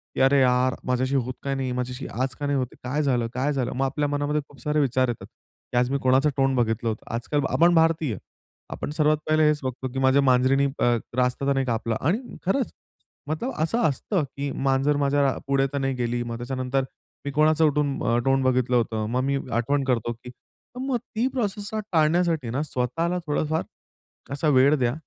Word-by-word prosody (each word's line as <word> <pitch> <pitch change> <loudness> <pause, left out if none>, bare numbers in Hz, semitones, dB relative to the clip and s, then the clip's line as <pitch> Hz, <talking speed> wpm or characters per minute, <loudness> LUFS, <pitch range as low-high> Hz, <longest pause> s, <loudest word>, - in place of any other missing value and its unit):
की - - 0
अरे 135 +1 +5
यार, 125 0 +3
माझ्याशी 130 +2 0
होत 130 -1 0
का 140 - -1
नाही? 130 -1 -2
माझ्याशी 125 +1 -4
आज 130 0 -1
का 145 - -5
नाही 140 0 +1
होत? 130 -1 0 0.2
काय 135 +4 -1
झालं? 125 -4 +1
काय 135 +4 0
झालं? 130 -3 -1
मग 135 +2 +1
आपल्या 145 +2 -1
मनामध्ये 145 +1 0
खूप 140 - -18
सारे 150 +2 0
विचार 130 -2 +2
येतात. 120 - -5
की - - -10
आज 125 0 +2
मी 140 - +1
कोणाचं 130 +3 +4
तोंड 135 -1 +2
बघितलं 115 -1 0
होतं? 110 - -5
आजकाल, 145 +5 -1
आपण 170 +1 +4
भारतीय. 160 - +2 0.5
आपण - - -5
सर्वात 155 -1 +3
पहिले 155 0 +3
हेच 150 -1 +2
बघतो, 130 0 -3
की 135 - -2
माझ्या 135 +1 +4
मांजरीनी 130 +1 +3
अ, 120 0 +3 0.2
रास्ता 125 +2 +1
तर 140 - +3
नाही 135 -1 0
कापला? 115 -1 -1
आणि 210 - -1
खरंच, 240 +7 0 0.6
मतलब 160 +12 -2
असं 225 +9 0
असतं, 160 - -1
की 140 0 -5
मांजर 135 +2 +1
माझ्या 140 -1 +2
पुढे 135 0 +2
तर - - -1
नाही 135 -1 0
गेली, 120 -1 -1
मग 115 -1 -5
त्याच्यानंतर 130 +2 -2 0.4
मी 140 - -2
कोणाचं 155 +2 +3
उठून 145 -2 0
अ, 115 - +2
तोंड 135 0 +3
बघितलं 130 -1 +2
होतं? 110 -2 0
मग 125 +2 0
मी 140 +1 +1
आठवण 135 +5 +1
करतो, 120 -3 0
की 125 +2 -12 0.5
मग 260 -1 0
ती 235 +1 -2
प्रोसेसला 215 -4 -3
टाळण्यासाठी 160 -4 +2
ना, 130 +5 -1
स्वतःला 155 +6 -1
थोडंफार 155 +1 0 0.7
असा 145 +3 -1
वेळ 140 +1 +5
द्या 120 -1 +1
135 Hz, 195 wpm, -25 LUFS, 125-150 Hz, 0.7 s, अरे